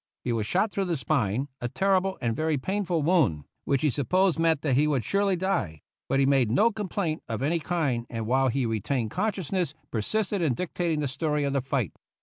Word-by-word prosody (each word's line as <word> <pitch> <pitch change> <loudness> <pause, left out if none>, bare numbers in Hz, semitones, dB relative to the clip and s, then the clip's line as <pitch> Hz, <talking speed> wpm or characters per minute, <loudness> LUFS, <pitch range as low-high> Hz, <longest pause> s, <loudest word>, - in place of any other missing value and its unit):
He 120 - -1
was 110 -2 -1
shot 205 - +1
through 195 - -1
the 170 -3 -1
spine, 125 -1 0
a 120 - -2
terrible 190 +3 +1
and 115 -2 0
very 155 -1 0
painful 180 +1 -1
wound, 140 - +2 0.2
which 140 0 +1
we 150 - +3
sup 125 0 -3
posed 185 -2 +3
meant 165 -3 +2
that 145 -4 +1
he 145 +4 +3
would 135 -7 0
surely 200 - +2
die; 170 - -2 0.3
but 135 +1 +2
he 135 - +4
made 135 -4 +3
no 210 - +4
complaint 195 -6 -2
of 115 +3 -2
any 165 +4 +1
kind, 145 -9 -1
and 115 -2 -4
while 130 +3 +2
he 130 +1 0
retained 115 +1 -1
consciousness 185 -5 -1 0.2
persisted 195 - -1
in 150 -7 +1
dictating 170 0 -1
the 145 - 0
story 150 +2 -1
of 140 -1 0
the 140 - +1
fight. 130 - -1
150 Hz, 210 wpm, -27 LUFS, 125-180 Hz, 0.3 s, he